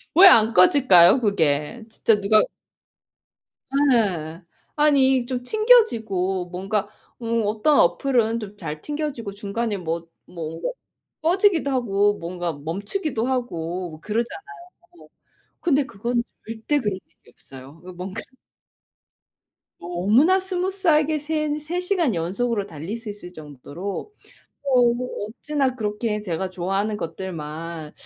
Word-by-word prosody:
왜 380 +4 +10
안 225 -9 +6
꺼질까요 185 - +6
그게. 185 -1 0
진짜 220 -1 +2
누가 215 +2 +5 1.5
네 175 -9 0 0.4
아니 270 -4 +3
좀 250 -1 -3
튕겨지고 230 - +2
뭔가 195 +3 -2 0.3
음 230 0 0
어떤 220 +8 +2
어플은 230 +5 +2
좀 210 -1 -9
잘 155 -6 -6
튕겨지고 290 - -4
중간에 210 +2 -3
뭐 170 -2 -4 0.2
뭐 165 -1 -6 0.6
꺼지기도 345 -3 +3
하고 205 -6 +2
뭔가 175 0 -4
멈추기도 205 - -3
하고 180 -9 -3
뭐 155 - -11
그러잖아요. 235 - -4 1.0
근데 290 -5 +2
그건 235 +1 -2 0.2
절대 225 +6 -1
그런 210 -7 -1
일이 - - -25
없어요. 135 +1 -13 0.2
뭔가 185 +1 -5 1.6
너무나 210 - +3
스무스하게 360 -5 +1
센 305 0 -1
세 310 +4 -4
시간 360 - +1
연속으로 200 +6 -1
달릴 165 +4 -6
수 230 -1 -8
있을 205 -4 -9
정도로 155 - -7 0.5
어 265 -3 +3 0.5
어찌나 270 +3 -1
그렇게 210 -1 -2
제가 185 -1 -3
좋아하는 195 +4 -2
것들만 165 -3 -6
215 Hz, 245 characters per minute, -23 LUFS, 180-275 Hz, 1.6 s, 왜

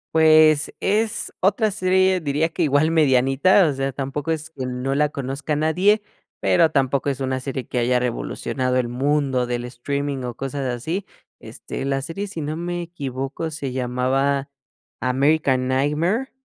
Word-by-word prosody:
Pues, 155 -1 +5
es 215 +2 0
otra 205 +3 +2
serie 185 -1 +2
diría 155 +1 0
que 170 +1 -2
igual 150 +2 +3
medianita, 145 +4 +4
o - - +1
sea, 135 0 -2
tampoco 140 +3 -3
es 160 0 -3
que 135 -5 -6
no 125 +1 -2
la 150 +2 +2
conozca 140 +1 -3
nadie, 180 +8 +2 0.4
pero, 170 -3 +4
tampoco 140 -1 +1
es 135 -1 -3
una 130 0 -1
serie 130 -1 -4
que 125 - -5
haya 125 +1 +2
revolucionado 125 +1 -2
el 125 -2 +1
mundo 135 0 0
del 120 0 -2
streaming 135 +3 -3
o 120 -1 -5
cosas 135 +1 -4
así. 160 - -3 0.3
Este, 135 - -7
la 135 0 0
serie, 180 +8 -5
si 190 -5 -6
no 150 +2 -3
me 175 +1 -3
equivoco, 145 -2 -5
se 145 -4 -4
llamaba 130 +2 0 0.5
American 130 0 +2
Nightmare, 155 - 0
140 Hz, 155 wpm, -22 LUFS, 130-160 Hz, 0.5 s, Pues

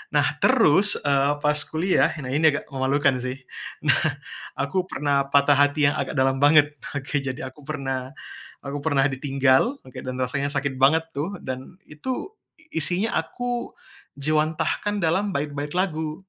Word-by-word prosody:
Nah - - +1
terus, 210 - +5
eee, 140 0 +2
pas 150 0 +1
kuliah, 175 +4 +1
nah 135 - -6
ini 155 +2 +4
agak - - -5
memalukan 135 0 +1
sih. 130 +1 -4 0.5
Nah - - +4 0.6
aku 180 +7 0
pernah 140 -4 0
patah 140 0 +5
hati 145 +1 +3
yang - - -5
agak 140 - -2
dalam 135 0 +2
banget, 145 0 +5 0.2
oke, 145 +1 -4
jadi 130 +1 -4
aku 130 +3 -14
pernah, 135 -4 -4 0.5
aku 140 +1 -4
pernah 145 -3 +2
ditinggal, 135 - +1
oke, 130 - -16
dan 130 0 -5
rasanya 140 +3 -1
sakit 140 -1 -2
banget 160 +5 +4
tuh, 165 +8 -3
dan 130 +6 -6
itu, 255 - -5 0.4
isinya 175 +8 0
aku 245 +8 -4 0.5
jiwantahkan 155 +7 0
dalam 190 +5 +1
bait-bait 145 0 -3
lagu. 160 -4 -1
145 Hz, 145 wpm, -24 LUFS, 135-160 Hz, 0.6 s, terus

